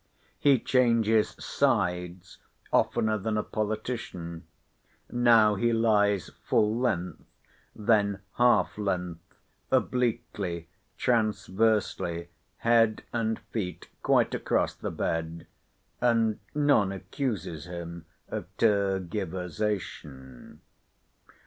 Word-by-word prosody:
He 140 -2 +5
changes 115 -3 +2
sides 90 0 -1 0.3
oftener 110 -1 +2
than 110 +2 -1
a 105 - 0
politician. 105 -6 -4 0.6
Now 115 -3 +5
he 120 +4 +1
lies 105 -4 +2
full 105 +1 +2
length, 110 -8 -1 0.5
then 100 -2 +2 0.2
half 105 -7 +3
length, 90 -4 -2 0.5
obliquely, 110 -8 -1 0.3
transversely, 105 -6 0 0.3
head 115 -2 +3
and 110 -1 0
feet 95 -6 -4
quite - - +3
across - - 0
the - - -5
bed; 80 0 -3 0.6
and 115 -3 +2 0.2
none 145 -10 +3
accuses 95 - -4
him 85 -1 -7 0.2
of - - -5
tergiversation. 95 - -2
105 Hz, 85 wpm, -28 LUFS, 90-115 Hz, 0.6 s, He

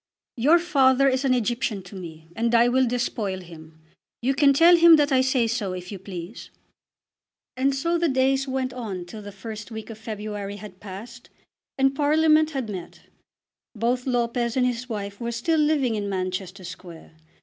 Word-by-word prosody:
Your 290 +8 +5
father 275 -6 +3
is 260 +1 +1
an 255 -1 +3
Egyptian 235 -3 -1
to 185 +2 -12
me, 160 -3 -9
and 235 +1 +1
I 235 +1 +5
will 260 +1 +3
despoil 225 -5 -2
him. 160 -2 -14 0.4
You 265 +3 +2
can 280 +1 +5
tell 335 +5 +6
him 335 -1 +8
that 295 -2 +2
I 260 -1 +4
say 260 -2 +2
so 220 -5 -2
if 180 +1 -7
you 200 - -6
please." 185 +1 -8 1.1
And 270 +1 +1
so 335 +5 0
the 340 -1 +2
days 265 +1 +1
went 260 -1 -2
on 205 -8 -5
till 210 +5 -9
the 205 0 -9
first 210 +2 -8
week 220 0 -7
of 220 - -10
February 210 -2 -5
had 200 -2 -11
passed, 220 +5 -10 0.5
and 270 0 +3
Parliament 310 +2 +3
had 270 -6 -4
met. 185 -5 -8 0.7
Both 245 +4 -1
Lopez 240 -1 0
and 255 - +3
his 250 0 -2
wife 200 -2 -5
were 235 0 -2
still 310 +8 0
living 295 -5 +2
in 205 -2 -3
Manchester 185 0 -4
Square. 170 -2 -10
235 Hz, 180 wpm, -24 LUFS, 200-270 Hz, 1.1 s, him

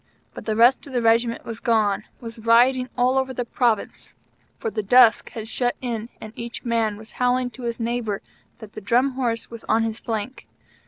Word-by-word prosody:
But - - -9
the 215 - 0
rest 240 +5 +4
of 275 - -10
the 245 - +1
Regiment 230 +1 +2
was 230 -1 -6
gone, 215 -4 +1
was 230 -1 -9
rioting 245 +3 +4
all 255 +2 +3
over 260 -1 -3
the 245 - -2
Province, 235 -3 -1 0.4
for 225 - -4
the 215 - -2
dusk 235 +3 +5
had 220 -1 -6
shut 245 +1 -1
in 235 -3 -4
and 215 0 -9
each 235 +1 -7
man 225 -3 0
was 220 +1 -12
howling 250 0 0
to 255 - -12
his 235 -1 -3
neighbor 230 -3 -2 0.3
that 220 -3 -12
the - - -8
Drum 245 +7 +2
Horse 240 -4 -2
was 230 -1 -9
on 225 +1 +2
his 225 0 -3
flank. 225 +3 -5
235 Hz, 200 wpm, -23 LUFS, 225-245 Hz, 0.4 s, dusk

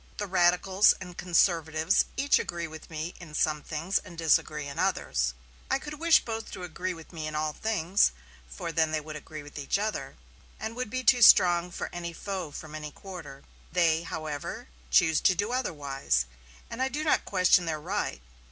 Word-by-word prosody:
The 205 - -2
radicals 185 +1 +4
and 180 -2 -9
conservatives 165 -1 +2
each 280 +1 +3
agree 170 -1 -3
with 160 0 -11
me 160 +2 -5
in 155 -4 -10
some 150 -1 +1
things 160 +6 -1
and 170 - -13
disagree 155 -2 +2
in 140 +3 -6
others. 65 - 0 0.3
I 265 - +3
could 295 +1 -8
wish 335 0 +5
both 225 -1 -4
to 185 - -7
agree 180 +1 -4
with 165 +2 -13
me 155 -2 -4
in 155 - -5
all 155 0 -1
things; 200 -1 +2 0.4
for 60 - -5
then 160 0 +2
they 155 - 0
would 155 0 -8
agree 155 0 -8
with 145 0 -9
each 140 +6 0
other, 215 +2 -3 0.4
and 220 +1 -5
would 250 -2 -3
be 255 +3 -3
too 245 +1 +5
strong 175 -4 +7
for 180 - -5
any 170 -1 -5
foe 190 -2 -4
from 150 +1 -9
any 155 -1 -5
quarter. 155 -6 -10 0.3
They, 165 -3 +3
however, 155 - -5 0.2
choose 155 - +4
to 185 - +4
do 205 +5 -1
otherwise, 140 - -1 0.4
and 230 - -6
I 265 - +2
do 295 +3 -3
not 310 - +2
question 180 -2 +3
their 155 -1 -1
right. 170 - -3
170 Hz, 190 wpm, -28 LUFS, 155-195 Hz, 0.4 s, strong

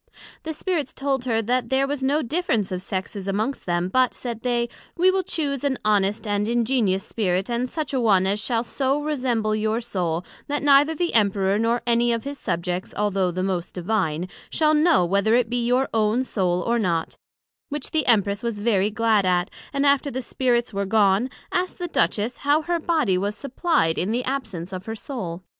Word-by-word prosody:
The 320 - -5
Spirits 315 -4 -2
told 270 -2 -2
her, 225 -2 +1
that 245 +2 0
there 265 +1 +2
was 280 0 -3
no 285 +4 +1
difference 235 - 0
of 180 -1 -3
Sexes 190 +1 -5
amongst 215 +7 -2
them; 175 0 0
but, 255 +6 +2
said 235 -3 -5
they, 240 -1 0 0.3
we 365 +2 +5
will 380 0 +1
chuse 290 -6 -2
an 275 -2 0
honest 205 0 +2
and 205 +1 0
ingenious 230 -5 +1
Spirit, 190 -1 -1
and 240 +2 -1
such 310 -1 -4
a 265 - +1
one 195 -5 +4
as 200 +2 +1
shall 230 -2 0
so 270 +4 0
resemble 250 -8 -1
your 215 +1 0
soul, 180 -7 -2 0.2
that 290 0 -2
neither 290 +2 +5
the 345 +2 -1
Emperor, 200 -2 +2
nor 230 +2 +1
any 235 0 +3
of 230 -1 -1
his 280 0 -6
Subjects, 175 +2 -3
although 195 -3 +1
the 185 +1 -3
most 185 -3 -2
Divine, 180 -3 -1 0.2
shall 310 -1 +2
know 305 - +4
whether 200 +5 +2
it 240 -2 +1
be 245 -1 0
your 255 +2 +2
own 220 +3 +2
soul, 180 -7 0
or 235 0 +1
not: 170 -6 -1 0.5
which 295 -1 -4
the 310 -3 0
Empress 205 -3 +3
was 230 -3 -3
very 205 -2 +2
glad 220 -1 +2
at, 180 +1 +1 0.2
and 280 +1 0
after 280 0 +3
the 260 -1 -4
Spirits 240 -1 0
were 200 0 -2
gone, 205 +3 +3 0.2
asked 365 +1 -1
the 355 - -3
Duchess, 235 -7 0
how 290 +2 +2
her 345 +1 0
body 305 - +1
was 205 +2 -2
supplied 275 - 0
in 185 - -1
the 245 +2 0
absence 200 -10 -4
of 185 +2 -7
her 220 - -3
soul? 190 -8 -6
230 Hz, 195 wpm, -23 LUFS, 195-270 Hz, 0.5 s, we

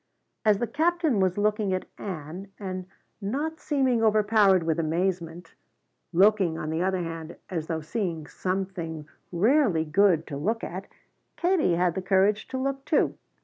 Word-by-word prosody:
As 210 -2 +4
the 240 - 0
Captain 315 - +1
was 185 -1 +1
looking 210 -2 +1
at 185 - -4
Ann 180 0 -6
and 185 -2 -5 0.3
not 290 +11 -2
seeming 260 -5 +1
overpowered 210 -4 +4
with 160 0 0
amazement, 170 0 -2 0.6
looking, 190 -2 +4
on 155 - -4
the 160 +1 -1
other 185 -1 0
hand, 165 0 -6 0.2
as 160 -3 -3
though 160 -1 -2
seeing 165 -2 -3
something 180 -4 -4 0.2
rarely 200 - +3
good 165 0 +3
to 140 - -6
look 220 +10 -1
at, 190 +3 -5 0.5
Katie 345 - +2
had 175 0 +2
the 190 - -3
courage 195 +3 +2
to 260 - -4
look 270 +1 -2
too. 300 - +2
190 Hz, 150 wpm, -26 LUFS, 165-215 Hz, 0.6 s, As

